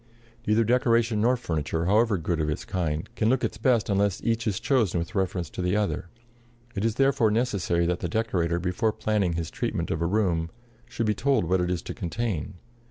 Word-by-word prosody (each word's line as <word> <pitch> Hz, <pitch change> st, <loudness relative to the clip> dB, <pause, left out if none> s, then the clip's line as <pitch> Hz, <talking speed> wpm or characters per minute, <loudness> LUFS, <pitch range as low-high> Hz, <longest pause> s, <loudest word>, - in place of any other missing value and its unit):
Neither 110 Hz, +2 st, +4 dB
decoration 115 Hz, -2 st, +2 dB
nor 125 Hz, +3 st, +3 dB
furniture, 80 Hz, -, -2 dB
however 105 Hz, +2 st, +3 dB
good 85 Hz, 0 st, -2 dB
of 75 Hz, -, 0 dB
its 75 Hz, -, -3 dB
kind, 80 Hz, -3 st, -2 dB
can 110 Hz, -, +1 dB
look 130 Hz, 0 st, +2 dB
its 105 Hz, -, -2 dB
best 120 Hz, -2 st, +2 dB
unless 100 Hz, -1 st, +1 dB
each 115 Hz, 0 st, 0 dB
is 100 Hz, -3 st, 0 dB
chosen 125 Hz, -10 st, +1 dB
with 85 Hz, +5 st, -3 dB
reference 95 Hz, -4 st, -1 dB
to -, -, -5 dB
the 90 Hz, +2 st, +1 dB
other. 100 Hz, -4 st, -2 dB, 0.6 s
It 100 Hz, -, -3 dB
is 115 Hz, -1 st, +1 dB
therefore 135 Hz, -4 st, +3 dB
necessary 100 Hz, -7 st, +1 dB
that 90 Hz, +1 st, 0 dB
the 85 Hz, -, -3 dB
decorator, 90 Hz, -5 st, 0 dB
before 90 Hz, +5 st, 0 dB
planning 105 Hz, -5 st, 0 dB
his 85 Hz, -1 st, -3 dB
treatment -, -, -2 dB
of 80 Hz, -, -2 dB
a 85 Hz, -, +1 dB
room, 90 Hz, -5 st, +1 dB, 0.4 s
should 115 Hz, -, -2 dB
be 105 Hz, -, +2 dB
told 135 Hz, -4 st, +1 dB
what 90 Hz, +2 st, +1 dB
it 90 Hz, -, 0 dB
is 90 Hz, -2 st, -2 dB
to -, -, -5 dB
contain. 95 Hz, -2 st, -3 dB
100 Hz, 205 wpm, -26 LUFS, 85-115 Hz, 0.6 s, Neither